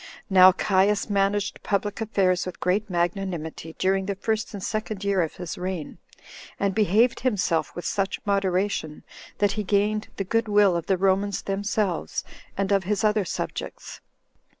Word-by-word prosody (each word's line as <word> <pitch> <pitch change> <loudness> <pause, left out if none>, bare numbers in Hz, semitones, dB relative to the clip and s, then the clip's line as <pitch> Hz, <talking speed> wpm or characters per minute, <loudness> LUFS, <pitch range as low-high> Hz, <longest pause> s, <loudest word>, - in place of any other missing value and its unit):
Now 185 0 +9
Caius 200 +2 +1
managed 200 0 0
public 205 +1 -2
affairs 185 -5 +1
with 185 - -7
great 205 +4 0
magnanimity 175 -3 -3
during 190 0 +1
the 200 - -1
first 220 +2 -2
and 200 -3 -7
second 215 -1 -3
year 200 -2 +2
of 160 - -2
his 175 -1 -6
reign, 180 -4 -4 0.6
and 200 -1 +1
behaved 220 +4 +3
himself 180 - 0
with 175 - -6
such 195 +3 -1
moderation, 195 -5 0 0.3
that 205 -1 +2
he 210 +1 -2
gained 210 +2 +1
the 195 - -1
good 230 +4 0
will 205 -3 +4
of 170 - -3
the 190 - +2
Romans 195 +2 +1
themselves, 195 - -1 0.3
and 195 0 0
of 195 -2 +2
his 205 +1 0
other 210 -2 +2
subjects. - - -5
195 Hz, 155 wpm, -25 LUFS, 185-205 Hz, 0.6 s, Now